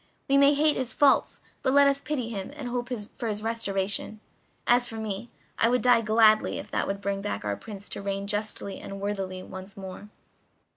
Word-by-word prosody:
We 275 - +3
may 280 +1 +6
hate 300 +1 +3
his 260 -1 -2
faults, 285 -2 +3 0.2
but 260 - +1
let 285 0 +8
us 280 0 +2
pity 265 -7 -2
him 200 -4 -5
and 255 -4 -5
hope 245 0 -3 0.2
for 240 - -4
his 210 -1 -3
restoration. 210 -2 -2 0.5
As 245 0 +4
for 225 - -8
me, 220 +1 -4 0.3
I 230 - +4
would 250 +1 +2
die 245 -2 +6
gladly 215 0 +4
if - - -8
that - - 0
could 195 0 -3
bring 200 0 -2
back 205 - -3
our 100 -1 0
Prince 205 - -9
to - - -5
reign 195 0 -2
justly 205 -1 -2
and 195 0 -7
worthily 195 -2 -3
once 190 +1 -9
more." 195 +2 -8
215 Hz, 200 wpm, -27 LUFS, 195-245 Hz, 0.5 s, let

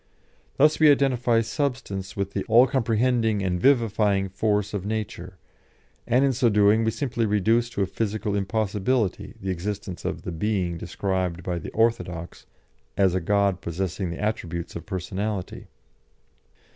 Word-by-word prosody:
Thus 150 +2 +4
we 155 -1 +7
identify 125 -5 +3
substance 115 - -3
with 100 0 -2
the - - -2
all 120 +3 +6
comprehending 115 -4 +1
and 90 -2 -1
vivifying 105 -6 +2
force 105 +1 0
of 100 -3 -3
nature, 100 -4 -5 0.7
and 130 +4 +3
in 135 - +2
so 120 -1 +2
doing 105 +1 +4
we 110 - +2
simply 120 -2 -1
reduce 110 +4 +2
to 100 -5 -1
a - - +1
physical 105 +1 -2
impossibility 105 +2 -1
the 95 0 -3
existence 95 +1 -5
of - - -4
the - - -4
Being 90 -1 -1
described 90 -1 -2
by 90 0 -2
the - - -7
orthodox 110 -7 -1 0.5
as 95 -3 +3
a 95 - 0
God 100 +1 +1
possessing 90 +2 -3
the 85 - -6
attributes 90 -6 -3
of 85 - -7
personality. 95 +1 -4
105 Hz, 145 wpm, -25 LUFS, 95-115 Hz, 0.7 s, we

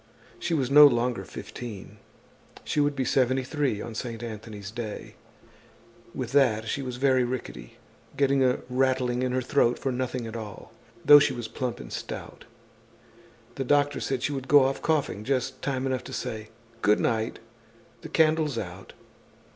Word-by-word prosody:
She 170 - -1
was 135 -3 -1
no 145 +1 +10
longer 120 -5 0
fifteen, 105 0 -9 0.7
she - - -1
would 145 0 +2
be 130 -1 -1
seventy 130 +1 +2
three 135 -6 -1
on 120 - -7
Saint 115 0 -5
Anthony's 105 -3 -7
day. 110 -2 -6 1.0
With - - -4
that 120 -6 +3
she 140 - -2
was 125 -2 -5
very 130 -1 +3
rickety, 120 - -6 0.4
getting 140 -1 +3
a 125 -1 +2
rattling 130 -1 +1
in 130 0 0
her 130 0 0
throat 125 -2 +2
for 135 - -2
nothing 125 -1 -3
at 115 0 -7
all, 110 -4 -8 0.3
though 145 - +10
she 140 - +2
was 120 -2 -5
plump 125 +1 -4
and - - -9
stout. - - -7 1.1
The 135 - -3
doctor 145 +2 +2
said 135 -2 -2
she 145 - 0
would 135 -1 -5
go 145 0 +7
off 135 +1 -1
coughing, 145 - 0
just 130 +1 -2
time 135 -1 -2
enough 130 -1 -1
to - - -8
say: 110 -1 -5 0.3
"Good 105 0 +4
night, 110 -1 0 0.6
the - - -9
candle's 155 -4 +2
out!" 95 -2 -7
125 Hz, 165 wpm, -27 LUFS, 115-135 Hz, 1.1 s, no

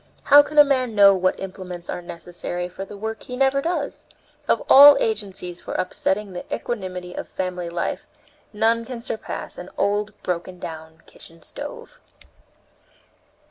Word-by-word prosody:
How 290 +1 +8
can 300 +1 -7
a 295 - +11
man 255 -5 0
know 200 -1 +8
what 185 -1 0
implements 185 -2 -8
are - - -4
necessary 175 +1 -6
for 185 +2 -8
the 200 - -11
work 220 +1 -5
he 250 - -7
never 270 +1 +2
does? 345 +4 -3 0.4
Of - - +1
all 285 +1 +10
agencies 195 -6 -3
for - - -7
upsetting 190 +2 -1
the 180 - -6
equanimity 185 -5 -4
of - - -7
family 180 -2 -4
life, 170 0 -3 0.4
none 225 +2 +1
can 245 0 -7
surpass 230 -2 -3
an 180 +1 -8
old, 205 +1 -1
broken 180 +1 -3
down 160 -1 -9
kitchen 165 0 -15
stove!" - - -9
195 Hz, 150 wpm, -22 LUFS, 180-235 Hz, 0.4 s, a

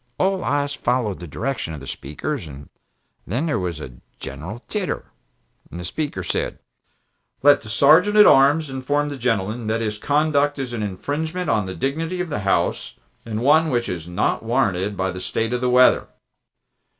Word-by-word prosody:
All 190 0 +1
eyes 145 0 0
followed 120 -7 -1
the 85 - -8
direction 95 - -3
of - - -8
the 70 - -10
Speaker's, 80 - -5
and 70 -1 -11 0.6
then 130 +8 -1
there 155 -3 0
was 90 -4 -3
a 65 -5 -9 0.2
general 105 +10 -7
titter. 205 -4 -3 0.6
The 90 +1 -7
Speaker 135 - -3
said: - - -2 0.9
"Let 145 0 +6
the 110 - -10
Sergeant 155 - +5
at 210 - +9
Arms 140 +2 +5
inform 145 +3 -1
the 145 - -5
gentleman 115 -2 -1
that 110 +1 0
his 105 -2 -3
conduct 145 +1 +2
is 130 -3 -4
an 115 - -3
infringement 150 - -2
of 105 -4 +1
the 95 - -5
dignity 160 +7 -2
of 180 -1 -2
the 145 - -2
House 100 -1 0 0.3
and 110 0 -3
one 155 +5 +4
which 120 -3 0
is 85 -2 -5
not 90 0 0
warranted 105 -5 0
by 95 0 0
the 90 +1 -7
state 115 +5 -2
of 125 - -1
the 125 - +1
weather." 125 +1 +5
125 Hz, 175 wpm, -22 LUFS, 95-145 Hz, 0.9 s, at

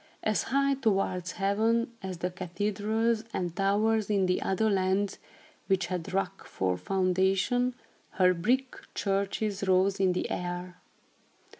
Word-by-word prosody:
As 215 -6 +1
high 275 +2 +3
towards 195 -8 0
heaven 225 +4 +1
as 190 -2 -5
the 180 +2 -2
cathedrals 210 +5 -1
and 175 -2 -2
towers 210 +2 +2
in 195 -3 +2
other 195 +3 +1
lands, 195 0 +1 0.5
which 190 -2 +2
had 175 -2 -4
rock 195 0 -2
for 95 -1 -1
foundation, 190 - +1 0.4
her 185 -1 +4
brick 250 +9 0 0.2
churches 200 0 -1
rose 190 +1 +3
in 190 -2 +3
the 180 - -2
air. 180 0 -4
195 Hz, 125 wpm, -29 LUFS, 185-215 Hz, 0.5 s, her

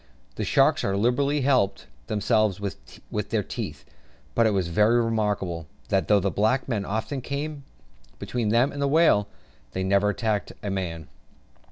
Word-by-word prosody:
The - - -4
sharks - - +3
as 100 - 0
liberally 140 +7 +1
helped 125 -8 +2 0.2
themselves 105 -2 +1
with 100 +1 -6
their 110 -2 0
teeth; - - -6 0.5
but 115 -1 +4
it - - +4
was 95 -4 0
very 105 +7 +3
remarkable, 105 -8 -1 0.2
that 95 -1 +1
though 105 -1 +5
the 100 0 0
black 110 +6 +1
men 110 -6 -1
often 110 +6 -3
came 140 +2 -4 0.5
between 120 -4 -2
them 120 +5 +3
and 140 - -5
the 140 - +2
whale, 140 -9 +4 0.5
they 95 - -2
never 100 +2 +3
attacked 105 -1 -1
a 100 - -2
man. 85 -5 -4
105 Hz, 160 wpm, -25 LUFS, 100-125 Hz, 0.5 s, though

